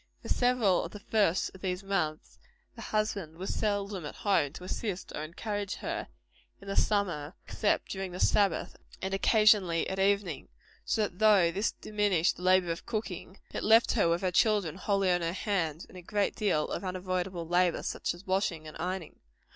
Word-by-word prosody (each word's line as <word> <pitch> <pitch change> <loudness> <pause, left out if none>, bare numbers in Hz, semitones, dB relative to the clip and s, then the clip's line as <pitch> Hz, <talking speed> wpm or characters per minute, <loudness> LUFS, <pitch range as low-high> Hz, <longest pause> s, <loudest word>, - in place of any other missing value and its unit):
For - - -8
several 245 -7 +3
of - - -7
the 210 - -8
first 200 -4 +1
of 190 - -14
these 185 0 -2
years, 175 -6 -2 0.4
the - - -9
husband 200 -7 -2
was 190 +2 -3
seldom 205 -3 -1
at 150 - -7
home 190 -9 +1
to 180 - -9
assist 190 0 -4
or - - -4
encourage 205 +5 -4
her, - - -4 0.5
in 200 - -14
the 195 - -3
summer, 175 -7 0
except 210 - 0
during 190 -1 -4
the 180 - -7
Sabbath 195 -5 +2 0.2
and 190 0 -3
occasionally 195 -4 +4
at 190 - -3
evening; 200 0 +1 0.4
so 220 - +1
that 190 -3 -4
though 205 -6 +5
this 200 +5 -1
diminished 205 -5 +1
the - - -10
labor 185 -1 +4
of 165 - -6
cooking, 195 -4 -4 0.2
it - - -3
left 225 +2 +5
her 205 -8 +3
with 170 +1 +1
her 185 - +1
children 195 -4 +2
wholly 195 -2 +1
on 175 0 +2
her 165 0 -1
hands, 175 -6 -1
and - - -17
a 180 - -8
great 205 +3 -1
deal 180 -8 +1
of - - -4
unavoidable 185 -2 -3
labor, 175 0 +2
such - - -2
as 175 +3 -14
washing 185 -4 -1
and 155 - -9
ironing. 180 -1 -4
190 Hz, 185 wpm, -30 LUFS, 175-205 Hz, 0.5 s, though